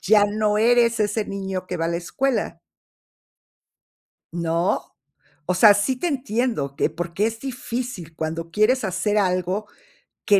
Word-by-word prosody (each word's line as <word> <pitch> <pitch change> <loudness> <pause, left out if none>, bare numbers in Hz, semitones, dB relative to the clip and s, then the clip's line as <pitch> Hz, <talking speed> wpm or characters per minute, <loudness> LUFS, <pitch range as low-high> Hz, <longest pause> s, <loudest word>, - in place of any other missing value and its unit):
ya 205 +1 +5
no 210 0 0
eres 235 0 +4
ese 210 +1 0
niño 190 -2 -4
que 180 - -3
va 165 - -2
a - - -1
la 170 - -1
escuela. 260 +9 -1 1.7
¿No? 170 +1 0 0.6
O 180 - +1
sea, 205 +3 +7
sí 225 +6 +1
te 350 - -2
entiendo, 235 - -1
que, 155 - +1
porque 170 +5 -2
es 225 0 -4
difícil 245 - -5
cuando 165 +1 -4
quieres 220 +4 +3
hacer 205 +3 0
algo 185 +1 0 0.6
que 200 -1 +5
205 Hz, 145 wpm, -23 LUFS, 175-230 Hz, 1.7 s, sea